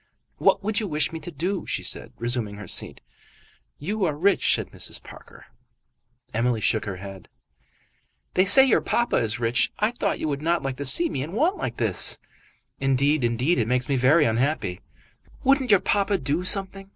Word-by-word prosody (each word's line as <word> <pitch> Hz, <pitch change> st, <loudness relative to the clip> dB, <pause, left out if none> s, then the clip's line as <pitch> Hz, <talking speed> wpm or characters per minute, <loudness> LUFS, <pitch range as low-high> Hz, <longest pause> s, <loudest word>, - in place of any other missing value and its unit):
"What -, -, +2 dB
would 210 Hz, 0 st, -1 dB
you 215 Hz, -, -4 dB
wish 150 Hz, -2 st, -1 dB
me 165 Hz, -, -6 dB
to 160 Hz, -, -9 dB
do?" 175 Hz, +5 st, -4 dB
she -, -, -3 dB
said, -, -, -3 dB
resuming 120 Hz, -3 st, -3 dB
her 105 Hz, 0 st, -9 dB
seat. -, -, -3 dB, 0.8 s
"You 205 Hz, +7 st, -4 dB
are 155 Hz, -4 st, -1 dB
rich," 195 Hz, +7 st, +1 dB
said -, -, -6 dB
Mrs. -, -, -4 dB
Parker. -, -, -15 dB, 0.9 s
Emily 115 Hz, +1 st, 0 dB
shook 110 Hz, +1 st, 0 dB
her 100 Hz, -2 st, -5 dB
head. 95 Hz, 0 st, -11 dB, 1.0 s
"They 185 Hz, -, +3 dB
say 265 Hz, +8 st, +9 dB
your 260 Hz, -, +2 dB
papa 240 Hz, 0 st, 0 dB
is 115 Hz, +1 st, -1 dB
rich. 115 Hz, +1 st, 0 dB
I 215 Hz, +2 st, 0 dB
thought 240 Hz, -, -3 dB
you -, -, -3 dB
would 140 Hz, -1 st, -3 dB
not 170 Hz, +2 st, 0 dB
like 135 Hz, -1 st, -4 dB
to 140 Hz, -, -4 dB
see 340 Hz, -, +5 dB
me 135 Hz, -, -4 dB
in 155 Hz, +6 st, -6 dB
want 325 Hz, -, 0 dB
like -, -, -5 dB
this." -, -, +3 dB, 0.6 s
"Indeed, 135 Hz, +2 st, +1 dB
indeed, 125 Hz, +7 st, 0 dB
it 115 Hz, -, 0 dB
makes 125 Hz, +1 st, -1 dB
me 140 Hz, -, 0 dB
very 135 Hz, +5 st, +3 dB
unhappy." 115 Hz, -, -1 dB, 0.6 s
"Wouldn't 270 Hz, -1 st, +2 dB
your 200 Hz, -3 st, +5 dB
papa 200 Hz, +1 st, 0 dB
do 145 Hz, +4 st, -2 dB
something? 195 Hz, 0 st, +2 dB
150 Hz, 190 wpm, -24 LUFS, 125-195 Hz, 1.0 s, say